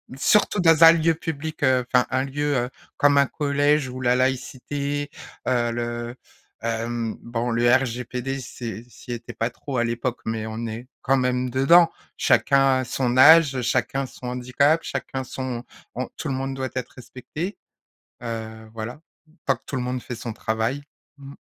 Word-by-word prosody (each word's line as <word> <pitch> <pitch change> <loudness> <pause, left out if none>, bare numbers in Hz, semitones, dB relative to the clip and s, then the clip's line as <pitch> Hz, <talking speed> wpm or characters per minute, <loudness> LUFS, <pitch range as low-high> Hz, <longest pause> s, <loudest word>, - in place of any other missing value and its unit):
Surtout 205 +9 +3
dans 165 -2 +5
un 165 - +11
lieu 165 0 +2
public, 155 -1 -5
heu 130 -2 +3
enfin 125 -1 +5
un 130 - +1
lieu, 145 +1 -1
heu, 125 -1 0 0.3
comme 145 0 +4
un 140 - +6
collège 145 0 +1
où 130 +1 -7
la 125 -1 +3
laïcité, 140 +3 -2 0.4
heu, 120 -2 +1
le, 120 0 -4 0.5
hem, 115 0 -2
bon 120 +1 -2
le 120 +1 +3
RGPD 125 +1 -1
c'est, 115 -2 -7
ça 120 - -11
y - - -1
était 120 0 -9
pas 115 - -1
trop 130 +2 -6
à 120 - +2
l'époque, 120 +1 -2
mais 110 -1 -2
on 110 +1 -4
est 115 +3 -7
quand 135 +1 +2
même 125 0 0
dedans. 165 +7 +5 0.3
Chacun 135 -1 +3
son 125 0 -1
âge, 145 -1 +7
chacun 130 +3 0
son 125 -1 -9
handicap, 125 +5 +2
chacun 130 -1 -4
son 125 -1 -5 0.3
on 125 +1 -3
tout - - -4
le - - -1
monde 135 +1 -2
doit 130 -1 -3
être 130 -2 -4
respecté, 140 - -6 0.7
heu, 110 -1 -6
voilà, 115 +6 -6 0.5
tant 135 - +3
que - - -28
tout 140 - -4
le 125 - -1
monde 125 0 -3
fait 125 - -6
son 115 0 -6
travail. 110 +6 -2 0.4
Mmh. 140 0 -10
130 Hz, 175 wpm, -24 LUFS, 120-140 Hz, 0.7 s, un